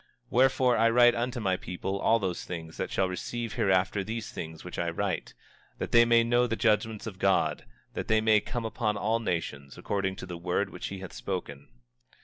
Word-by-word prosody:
25:3 - - -34 0.2
Wherefore, 130 0 +4
I 115 +1 +4
write 120 +1 +6
unto 120 +1 -2
my 95 -4 +1
people, 95 +2 -4
unto - - -6
all 115 - +5
those 95 -5 -3
that 80 -2 -5
shall 95 - +1
receive 115 +5 -4
hereafter 95 -3 +1
these 110 +2 -5
things 80 -1 -7
which 90 - -6
I 85 - 0
write, 85 - -3 0.4
that - - -4
they 115 0 +7
may 115 0 +5
know 120 +1 +3
the 115 - -1
judgments 110 0 +1
of 100 -4 -7
God, 95 -1 +1 0.3
that - - -4
they 110 -1 +4
come 120 +2 -4
upon 110 -2 -1
all 110 +3 +1
nations, 75 -9 -4
according 95 -2 -2
to - - -7
the 90 -2 -7
word 90 +3 -1
which - - -5
he 95 -1 -7
hath 95 -3 -8
spoken. 70 +3 -5
105 Hz, 200 wpm, -28 LUFS, 90-115 Hz, 0.4 s, they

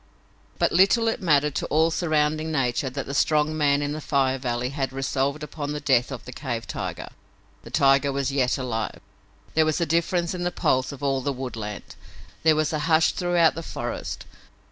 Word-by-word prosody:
But - - +2
little 200 +6 +4
it 225 - -1
mattered 150 -4 +3
to - - -2
all 160 +2 +3
surrounding 155 -1 0
nature 135 -1 0
that 135 +2 -5
the 140 - -6
strong 150 +2 +2
man 145 -2 +2
in 145 - -2
the 155 +1 -4
Fire 135 -2 +1
Valley 125 -1 -2
had 135 -1 -2
resolved 135 +2 -1
upon 150 0 -5
the 150 - -3
death 130 -4 +2
of - - -7
the - - -8
cave - - -4
tiger. - - -5 0.5
The - - -12
tiger 140 0 +3
was 140 0 -1
yet 130 -3 +1
alive! 120 -4 -3 0.5
There 160 - +4
was 155 +1 0
a 170 - +1
difference 170 +2 0
in 180 - -5
the 175 - 0
pulse 130 -6 0
of 140 0 -10
all 135 -1 +1
the 140 - -1
woodland. 115 -6 -6 0.5
There 160 -1 +4
was 155 +1 0
a 155 - 0
hush 160 0 +4
throughout 175 -3 +2
the 165 - -5
forest. 120 -6 -5
145 Hz, 195 wpm, -25 LUFS, 135-160 Hz, 0.5 s, little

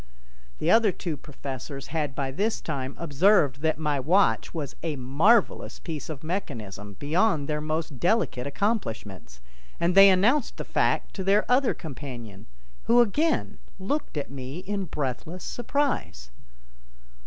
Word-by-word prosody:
The - - +1
other 225 -3 +5
two 170 -3 -4
professors 140 -1 -7
had 150 -3 -2
by 135 -2 -2
this 210 +10 -1
time 130 0 -4
observed 150 -3 +3
that 160 0 +1
my 150 -3 0
watch 180 +9 +2
was 150 -5 -5
a 160 -2 -2
marvelous 150 - +2
piece 160 -4 -6
of 150 -2 -6
mechanism 110 - -5
beyond 155 - +1
their 150 0 -1
most 155 -3 -3
delicate 175 - +1
accomplishments, 110 - -3 0.4
and 170 +1 +2
they 195 +1 +9
announced 220 +9 +3
the - - -5
fact - - 0
to 190 - -2
their 200 +3 +3
other 255 +1 +3
companion 125 - -8 0.4
who 240 +1 +5
again 295 +8 +1 0.2
looked 205 - -3
at 140 - -4
me 135 +2 -6
in 195 0 -3
breathless 150 +4 -4
surprise. 225 - -2
155 Hz, 140 wpm, -26 LUFS, 135-200 Hz, 0.4 s, they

